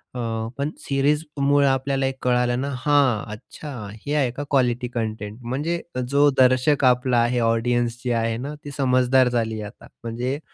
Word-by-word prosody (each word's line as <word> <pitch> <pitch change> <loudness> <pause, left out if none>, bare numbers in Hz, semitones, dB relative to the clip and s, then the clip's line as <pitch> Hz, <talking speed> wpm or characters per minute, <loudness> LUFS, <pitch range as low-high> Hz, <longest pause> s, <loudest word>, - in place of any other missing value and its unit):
अ, 115 -2 -3
पण 140 +2 -1
सिरीजमुळे 145 0 +1
आपल्याला 135 0 0 0.2
कळालं 125 0 +1
ना, 140 - -2
हां, 135 -4 +2
अच्छा 145 +7 -10 0.3
हे 145 - -2
आहे 135 -5 +2
का 135 +4 -5
क्वालिटी 125 -3 +1
कंटेंट. 110 -2 -4
म्हणजे 145 +8 -2 0.3
जो 140 +2 +4
दर्शक 130 +3 +4
आपला 125 0 +3
आहे, 120 +1 +1
ऑडियन्स 120 +1 +1
जी 125 - -1
आहे 115 0 -1
ना, 140 +5 -5
ती 145 - -7
समजदार 130 -1 +3
झाली 115 -2 -1
आहे - - -5
आता 115 - -17 0.2
म्हणजे 125 +4 -3
125 Hz, 160 wpm, -23 LUFS, 120-140 Hz, 0.3 s, जो